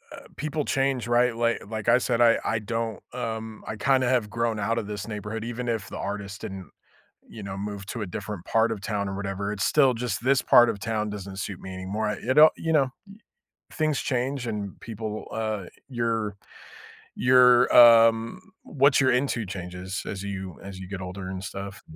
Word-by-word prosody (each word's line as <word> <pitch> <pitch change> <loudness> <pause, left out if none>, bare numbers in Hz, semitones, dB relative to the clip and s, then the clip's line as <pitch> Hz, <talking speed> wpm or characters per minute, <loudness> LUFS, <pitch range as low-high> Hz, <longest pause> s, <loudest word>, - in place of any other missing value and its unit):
uh, - - -13
people 150 +1 -2
change, 135 -3 0
right? 120 0 +3
Li 115 0 +1
like 110 0 -3
I 120 - +6
said, 120 -2 0
I 115 -1 +6
I 115 - 0
don't, 115 0 -3
um 110 -2 -5
I 110 - -4
kinda 130 +2 +2
have 120 -5 +1
grown 115 0 -1
out 115 +3 0
of 115 - -2
this 105 -1 -5
neighborhood 105 0 -5
even 120 +1 -5
if 115 -3 -2
the - - -7
artists 100 0 -5
didn't, 95 -2 -7 0.6
you 110 - -10
know, 95 -1 -6
move 100 -1 -5
to 115 - -5
a - - -5
different 95 +1 -6
part 115 0 +2
of 110 - -3
town 100 -2 -2
or 95 - -4
whatever. 100 0 -3
It's 100 -1 -1
still 135 -4 +4
just 115 -1 -3
this 135 +1 +3
part 120 0 +6
of 110 -3 -3
town 110 0 -2
doesn't 100 -2 -7
suit 100 -2 -5
me 95 - -8
anymore. 95 +4 -3
I 105 - -3
you 130 - -1
don't 155 +1 +8
you 160 0 -1
know, 140 -4 +3 0.2
y 195 - -13 0.6
things 155 -3 0
change 130 0 -2
and 105 -4 -5
people 110 -1 -6
uh, 110 -4 -3 0.2
your 115 -5 -2 0.8
your, 125 -1 +6
um 115 +4 +7 0.2
what 140 0 +3
you're 130 - +4
into 125 -3 0
changes 90 +1 -6
as 95 -1 -5
you 95 -2 -5
as 95 -1 -8
you 95 - -8
get 95 0 -6
older 95 +1 -6
and 95 0 -5
stuff. 95 +1 -7
110 Hz, 200 wpm, -26 LUFS, 100-120 Hz, 0.8 s, don't